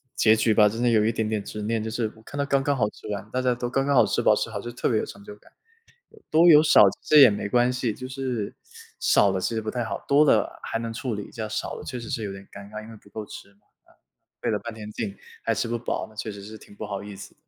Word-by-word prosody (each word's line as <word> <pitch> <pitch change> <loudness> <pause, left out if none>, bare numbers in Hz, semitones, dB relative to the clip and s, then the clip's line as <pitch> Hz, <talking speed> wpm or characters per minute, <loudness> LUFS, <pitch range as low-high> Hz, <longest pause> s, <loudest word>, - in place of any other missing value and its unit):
结 110 0 +5
局 110 0 +2
吧， 105 -1 +5
真 115 +3 -4
的 120 - +4
有 110 -2 +4
一 115 - +2
点 110 -1 -2
点 105 -2 -2
执 105 - -6
念， 110 0 -1
就 110 - -3
是 110 -1 -2
我 110 - -17
看 145 - -9
到 140 - 0
刚 140 -1 +1
刚 140 -1 0
好 105 -3 +2
吃 - - -13
完， 100 0 -4
大 130 - -1
家 125 -1 +1
都 120 0 -3
刚 135 +2 0
刚 140 - +2
好 - - +6
吃 - - 0
饱 - - +5
吃 - - -2
好， - - -4
就 120 - -6
特 120 - -2
别 110 -3 +2
有 - - -2
成 100 0 -11
就 105 - -10
感。 - - -23 0.6
有 440 - -18
多 165 +3 +6
有 150 -1 +8
少， 155 - +6 0.2
其 - - -4
实 150 - +10
也 130 - +10
没 100 0 -3
关 120 +3 +3
系。 125 -3 -1
就 130 - -8
是， 130 -5 -4 0.4
少 100 - +4
了 95 - -1
其 105 - -2
实 110 - -1
不 110 - -4
太 120 -1 -2
好， - - -5
多 145 +2 +5
了 - - +2
还 115 - -3
能 115 0 -4
处 120 +1 -4
理 105 - -5
一 - - -14
下。 110 -2 -5
少 110 - -4
了 - - -8
确 125 -2 -5
实 115 - -8
是 115 -4 -3
有 100 - -4
点 95 0 -10
尴 100 0 -10
尬。 105 0 -7
因 110 - -12
为 115 - -11
不 - - -22
够 110 - -5
吃 100 - -11
嘛， 100 - -33 0.8
费 - - 0
了 - - 0
半 115 - -7
天 105 -1 -9
劲 105 -2 -5 0.3
还 - - +1
吃 - - -1
不 120 - -2
饱， 120 - -3
那 110 - -19
确 110 0 -4
实 100 -1 -10
是 110 +1 -9
挺 100 - -16
不 110 - -6
好 100 -1 -5
意 100 -1 -9
思。 100 - -11
110 Hz, 335 characters per minute, -25 LUFS, 105-125 Hz, 0.8 s, 实